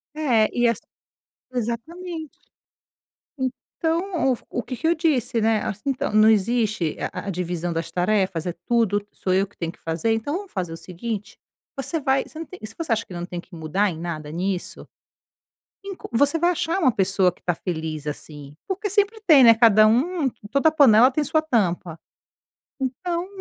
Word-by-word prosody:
É, 240 Hz, -8 st, +3 dB
e 240 Hz, 0 st, +3 dB
ass 230 Hz, -, +1 dB, 0.8 s
exatamente. 315 Hz, +8 st, -4 dB, 1.1 s
Então, 320 Hz, +5 st, -1 dB
o -, -, +2 dB
f -, -, -20 dB
o 245 Hz, -, -2 dB
que 255 Hz, -, -5 dB
que 320 Hz, -, -1 dB
eu 340 Hz, -, +3 dB
disse, 265 Hz, -7 st, +1 dB
né, 220 Hz, 0 st, +2 dB
assim: 210 Hz, 0 st, -4 dB
"Então, 270 Hz, -2 st, -1 dB
não 215 Hz, +1 st, +6 dB
existe 215 Hz, -5 st, +1 dB, 0.2 s
a -, -, -6 dB
a -, -, -1 dB
divisão 175 Hz, -1 st, -3 dB
das 165 Hz, 0 st, -3 dB
tarefas? 185 Hz, -2 st, 0 dB
É 175 Hz, -, -2 dB
tudo, 210 Hz, -4 st, +2 dB
sou 185 Hz, -, -2 dB
eu 195 Hz, +2 st, +2 dB
que 200 Hz, -, -28 dB
tenho 165 Hz, -1 st, -3 dB
que -, -, -23 dB
fazer? 165 Hz, +7 st, -1 dB
Então, 225 Hz, +7 st, -2 dB
vamos 400 Hz, -1 st, -9 dB
fazer 180 Hz, -4 st, -3 dB
o -, -, -7 dB
seguinte? 195 Hz, +5 st, -6 dB, 0.4 s
Você 275 Hz, +4 st, -2 dB
vai 265 Hz, -1 st, +1 dB
você -, -, -14 dB
não 330 Hz, -, -5 dB
tem 370 Hz, -, -12 dB
e 215 Hz, -, -6 dB
se 220 Hz, -, -14 dB
você 330 Hz, -6 st, -4 dB
acha 225 Hz, 0 st, +1 dB
que -, -, -11 dB
não 175 Hz, 0 st, -4 dB
tem 175 Hz, -1 st, -6 dB
que 180 Hz, -, -15 dB
mudar 165 Hz, +6 st, 0 dB
em 165 Hz, -, -6 dB
nada 155 Hz, -3 st, -5 dB
nisso, 180 Hz, +2 st, -3 dB, 1.0 s
enco 390 Hz, -2 st, -8 dB
você 285 Hz, +7 st, +3 dB
vai 345 Hz, +2 st, +3 dB
achar 345 Hz, +1 st, -1 dB
uma 300 Hz, -8 st, +4 dB
pessoa 190 Hz, -1 st, +3 dB
que 180 Hz, -, -25 dB
tá 175 Hz, -, +1 dB
feliz 160 Hz, -3 st, -4 dB
assim," 145 Hz, -1 st, -8 dB
porque 405 Hz, +2 st, -2 dB
sempre 410 Hz, +2 st, +1 dB
tem, 295 Hz, -6 st, +8 dB
né, 230 Hz, -1 st, +9 dB
cada 220 Hz, -2 st, +6 dB
um 280 Hz, +6 st, +2 dB, 0.2 s
toda 280 Hz, +6 st, +3 dB
panela 255 Hz, -5 st, +6 dB
tem 300 Hz, +3 st, 0 dB
sua 310 Hz, +2 st, +2 dB
tampa. 180 Hz, -, -1 dB, 0.8 s
Então 340 Hz, +7 st, -2 dB
225 Hz, 190 wpm, -23 LUFS, 180-305 Hz, 1.1 s, né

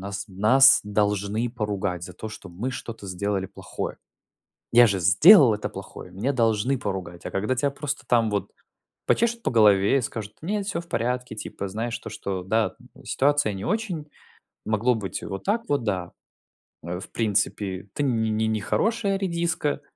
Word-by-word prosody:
нас 100 Hz, 0 st, -5 dB
нас, 110 Hz, +8 st, +6 dB
должны 105 Hz, +2 st, 0 dB
поругать 100 Hz, -6 st, -3 dB
за 90 Hz, -, -9 dB
то, 110 Hz, +5 st, -7 dB
что 105 Hz, -3 st, -10 dB
мы 105 Hz, +10 st, -4 dB
что-то 115 Hz, -4 st, -7 dB
сделали 95 Hz, +1 st, -2 dB
плохое. -, -, -6 dB, 0.8 s
"Я 120 Hz, 0 st, +8 dB
же 100 Hz, -3 st, 0 dB
сделал 120 Hz, -, +7 dB
это 105 Hz, -, -4 dB
плохое, -, -, -10 dB
меня 120 Hz, +9 st, -1 dB
должны 115 Hz, +1 st, +1 dB
поругать". 95 Hz, -6 st, -5 dB
А -, -, -4 dB
когда 105 Hz, +6 st, -1 dB
тя 140 Hz, +2 st, +1 dB
просто 145 Hz, +1 st, -4 dB
там 115 Hz, -3 st, +3 dB
вот 100 Hz, -1 st, -2 dB, 0.6 s
почешут 235 Hz, 0 st, +1 dB
по -, -, 0 dB
голове 105 Hz, +1 st, +5 dB
и -, -, +1 dB
скажут: 110 Hz, -3 st, -5 dB
"Нет, 200 Hz, +3 st, -2 dB
всё 170 Hz, -4 st, -2 dB
в 170 Hz, -, -14 dB
порядке, 125 Hz, -3 st, -2 dB
типа, 100 Hz, -2 st, -5 dB
знаешь, 115 Hz, +3 st, -3 dB
то, -, -, -9 dB
что 95 Hz, -2 st, -4 dB
да, 110 Hz, +1 st, 0 dB, 0.3 s
ситуация 145 Hz, -3 st, +2 dB
не 95 Hz, 0 st, -6 dB
очень, 190 Hz, -7 st, -2 dB, 0.6 s
могло 110 Hz, +3 st, +2 dB
быть 100 Hz, -3 st, -4 dB
и -, -, -7 dB
вот 95 Hz, -1 st, -6 dB
так 220 Hz, +4 st, +1 dB
вот, 145 Hz, -4 st, +1 dB
да, 90 Hz, -5 st, -2 dB, 0.7 s
э, 90 Hz, +1 st, -4 dB
в -, -, -9 dB
принципе, 100 Hz, -3 st, -1 dB
ты 145 Hz, -, -1 dB
не 110 Hz, -3 st, +1 dB
нехорошая 195 Hz, -, 0 dB
редиска, 170 Hz, -5 st, -1 dB
110 Hz, 170 wpm, -25 LUFS, 100-140 Hz, 0.8 s, Я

